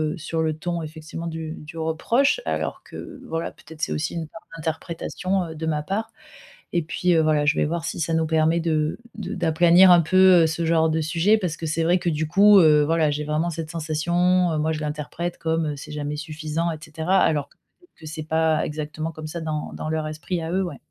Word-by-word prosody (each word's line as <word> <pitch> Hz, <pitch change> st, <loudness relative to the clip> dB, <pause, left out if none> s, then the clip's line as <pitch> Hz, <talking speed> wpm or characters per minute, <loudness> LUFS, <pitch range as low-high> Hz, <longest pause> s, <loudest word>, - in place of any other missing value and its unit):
heu, -, -, -12 dB
sur 160 Hz, +1 st, -3 dB
le 155 Hz, -1 st, -1 dB
ton 170 Hz, +1 st, -3 dB
effectivement 155 Hz, +1 st, -7 dB
du 160 Hz, -1 st, -5 dB
du 155 Hz, +2 st, -11 dB
reproche 230 Hz, -, +1 dB
alors -, -, -3 dB
que 270 Hz, -, -10 dB
voilà, 165 Hz, -8 st, -3 dB
peut-être 160 Hz, -1 st, -14 dB
c'est -, -, 0 dB
aussi 155 Hz, +3 st, -3 dB
une 165 Hz, -2 st, -4 dB
part 165 Hz, -, -12 dB, 0.2 s
d'interprétation, 170 Hz, +3 st, -3 dB
heu, 160 Hz, -1 st, -8 dB
de 160 Hz, -, -5 dB
ma 150 Hz, -2 st, 0 dB
part 215 Hz, +8 st, -3 dB, 0.6 s
et 170 Hz, -, +2 dB
puis, 175 Hz, +2 st, 0 dB
heu, 160 Hz, -, +4 dB
voilà, 150 Hz, -1 st, +2 dB
je -, -, +4 dB
vais -, -, +2 dB
voir 165 Hz, +2 st, -2 dB
si -, -, -4 dB
ça 165 Hz, 0 st, -1 dB
nous 160 Hz, 0 st, +1 dB
permet 160 Hz, +1 st, +2 dB
de 155 Hz, 0 st, 0 dB, 0.2 s
de 210 Hz, -2 st, -6 dB
d'aplanir 175 Hz, +1 st, +5 dB
un 175 Hz, -1 st, +7 dB
peu, 185 Hz, +1 st, +6 dB
heu, -, -, +5 dB
ce 160 Hz, +1 st, -2 dB
genre 160 Hz, -1 st, +3 dB
de 160 Hz, +1 st, 0 dB
sujet 170 Hz, +7 st, +2 dB
parce 175 Hz, -5 st, -3 dB
que -, -, -8 dB
c'est 160 Hz, +1 st, -1 dB
vrai 175 Hz, +2 st, +3 dB
que 175 Hz, -1 st, -1 dB
du 155 Hz, 0 st, -1 dB
coup, 200 Hz, +4 st, +7 dB
heu, 150 Hz, -2 st, +6 dB
voilà, 160 Hz, -1 st, +2 dB
j'ai 150 Hz, +1 st, -2 dB
vraiment 155 Hz, +3 st, 0 dB
cette 165 Hz, -1 st, -5 dB
sensation, 170 Hz, +3 st, +1 dB
heu, 155 Hz, -, -1 dB
moi 160 Hz, +1 st, 0 dB
je 155 Hz, -, -4 dB
l'interprète 150 Hz, +3 st, -4 dB
comme 160 Hz, -2 st, -1 dB
c'est 145 Hz, -, -9 dB
jamais 150 Hz, 0 st, -3 dB
suffisant 155 Hz, +2 st, -3 dB
et 160 Hz, -, -4 dB
cetera 160 Hz, +4 st, -1 dB
alors 145 Hz, -3 st, +1 dB
que -, -, -28 dB, 0.2 s
peut-être 355 Hz, -, -27 dB
que 160 Hz, -, -13 dB
c'est 155 Hz, 0 st, -6 dB
pas 160 Hz, 0 st, +1 dB
exactement 155 Hz, +1 st, -4 dB
comme 155 Hz, 0 st, -8 dB
ça 170 Hz, +2 st, -5 dB
dans 155 Hz, -2 st, -4 dB
dans -, -, -5 dB
leur 155 Hz, 0 st, -1 dB
esprit 155 Hz, +3 st, -4 dB
à 160 Hz, -, -4 dB
eux. 190 Hz, +1 st, +1 dB
Ouais. 175 Hz, -6 st, -4 dB
160 Hz, 230 wpm, -23 LUFS, 155-170 Hz, 0.6 s, un